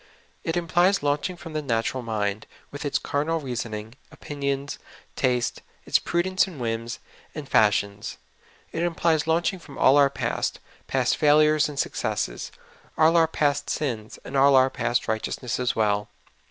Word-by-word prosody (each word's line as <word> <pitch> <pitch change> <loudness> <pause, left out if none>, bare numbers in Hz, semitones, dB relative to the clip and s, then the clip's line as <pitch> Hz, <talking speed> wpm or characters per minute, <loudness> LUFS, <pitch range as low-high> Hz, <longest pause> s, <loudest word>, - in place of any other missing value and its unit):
It 165 +1 -1
implies 175 +2 +2
launching 145 +5 0
from 165 -2 -9
the 155 - -1
natural 125 -1 -1
mind, 105 -2 -2 0.2
with 145 +1 -6
its 145 - +1
carnal 155 +3 -1
reason 120 -5 -4
ing, 105 +2 -8 0.2
opinions, 140 -1 -4 0.4
taste, 125 -2 0 0.2
its - - +3
prudence 185 +2 +1
and 170 -7 -10
whims, 115 0 -3 0.4
and 150 -3 -6
fash 105 -5 +4
ions. 100 +1 -9 0.5
It 165 - -3
implies 165 -2 +1
launching 170 +4 +1
from 145 -5 -13
all 135 - +5
our 140 -1 +6
past 140 - -2
— - - -26
past 130 -2 +1
fail 150 -1 +5
ures 155 0 +4
and 145 - -8
successes, - - -2 0.5
all 160 +2 +5
our 165 -1 +5
past 145 -2 0
sins, 115 -7 -3
and 140 - -7
all 140 0 +6
our 130 0 +5
past 120 -1 -1
righteousness 110 +2 -2
as 125 -1 0
well. 105 -1 +1
140 Hz, 165 wpm, -25 LUFS, 115-160 Hz, 0.5 s, our